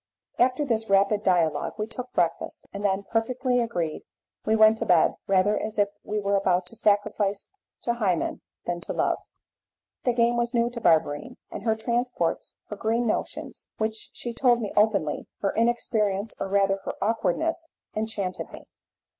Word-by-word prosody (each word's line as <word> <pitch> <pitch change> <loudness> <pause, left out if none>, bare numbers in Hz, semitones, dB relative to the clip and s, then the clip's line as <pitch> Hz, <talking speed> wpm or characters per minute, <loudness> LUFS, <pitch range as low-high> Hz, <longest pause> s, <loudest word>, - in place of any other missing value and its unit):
After 255 +4 +3
this 225 -4 -1
rapid 200 +1 +4
dialogue 165 -7 +1
we 215 - -1
took 245 +3 -7
breakfast, 170 -1 -1
and 200 0 -5
then, 195 0 +1
perfectly 245 +4 0
agreed, 175 -10 -2 0.5
we 220 - +4
went 220 0 +6
to - - -1
bed, 175 -3 +5
rather 195 +2 +3
as 215 0 -4
if 205 -1 +3
we 210 0 -2
were 200 0 +1
about 185 -2 +2
to 205 - -14
sacrifice 205 -2 +1 0.3
to 235 - +1
Hymen 195 -8 0 0.2
than 175 0 -2
to - - -5
love. - - +1 0.8
The 245 - +2
game 235 0 +3
was 235 +1 0
new 235 0 +2
to 235 -1 -6
Barberine, 160 - +2
and - - -6
her 220 -1 +3
transports, 235 -5 -1
her 210 - -4
green 225 +3 0
notions 215 - -3
which 220 0 -2
she 240 - -4
told 240 0 +3
me 210 -4 -4
openly 200 -8 +2
her 195 - +1
inexperience, 220 -3 +1
or - - -2
rather 195 0 +3
her - - -3
awkwardness, 230 - 0 0.3
enchanted 215 -4 -3
me. - - -10
215 Hz, 165 wpm, -26 LUFS, 195-235 Hz, 0.8 s, went